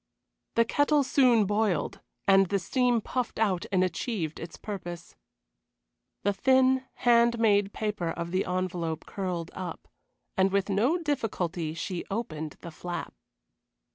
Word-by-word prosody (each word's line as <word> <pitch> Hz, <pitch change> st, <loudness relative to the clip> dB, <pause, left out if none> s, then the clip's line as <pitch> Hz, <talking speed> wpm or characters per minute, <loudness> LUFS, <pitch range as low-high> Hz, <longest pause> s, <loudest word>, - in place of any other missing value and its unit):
The 230 Hz, -, +5 dB
kettle 290 Hz, +4 st, +3 dB
soon 250 Hz, -5 st, +4 dB
boiled, 205 Hz, -6 st, 0 dB, 0.3 s
and 195 Hz, -1 st, +6 dB
the 200 Hz, -, +1 dB
steam 245 Hz, +4 st, +1 dB
puffed 250 Hz, +2 st, -3 dB
out 195 Hz, -5 st, +1 dB
and 185 Hz, -1 st, +3 dB
achieved 180 Hz, -3 st, -2 dB
its 165 Hz, -, -8 dB
purpose. 175 Hz, -5 st, -7 dB, 1.1 s
The 205 Hz, -, +2 dB
thin, 260 Hz, +3 st, +3 dB
hand 235 Hz, 0 st, +4 dB
made 205 Hz, -3 st, +3 dB
paper 210 Hz, -6 st, -2 dB
of 170 Hz, +1 st, -4 dB
the 185 Hz, +1 st, +1 dB
envelope 180 Hz, -3 st, -2 dB
curled 180 Hz, -4 st, -4 dB
up, 180 Hz, -3 st, -6 dB, 0.5 s
and 190 Hz, 0 st, +3 dB
with 200 Hz, 0 st, +1 dB
no 230 Hz, -, +2 dB
difficulty 185 Hz, -, -2 dB
she 170 Hz, +1 st, -3 dB
opened 160 Hz, -8 st, -4 dB
the 170 Hz, -, -8 dB
flap. 175 Hz, +2 st, -5 dB
195 Hz, 135 wpm, -28 LUFS, 175-235 Hz, 1.1 s, and